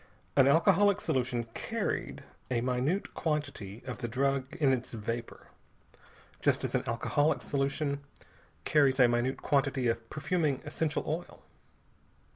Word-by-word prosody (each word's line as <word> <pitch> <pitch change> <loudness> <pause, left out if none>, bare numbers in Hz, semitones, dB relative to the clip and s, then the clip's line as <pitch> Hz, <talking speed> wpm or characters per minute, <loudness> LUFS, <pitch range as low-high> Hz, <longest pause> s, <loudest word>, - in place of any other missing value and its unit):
An 135 -1 +6
alcoholic 195 +7 +5
solution 125 -5 0
"carried" - - -3 0.3
a 125 -2 +1
minute 130 +10 0
quantity 125 - -3
of 125 -4 -5
the 120 - -3
drug 135 +2 0
in 140 -4 +3
its 125 -1 -3
vapor, 115 +1 -5 0.9
just - - +2
as - - -2
an - - +1
alcoholic 145 +1 +1
solution 140 +1 -1 0.7
carries 140 -3 +3
a 125 - +8
minute 120 +2 0
quantity 135 -3 +1
of 115 0 -3
perfuming 155 -3 0
essential 160 -2 -1
oil. 165 +3 -4
135 Hz, 125 wpm, -30 LUFS, 125-150 Hz, 0.9 s, a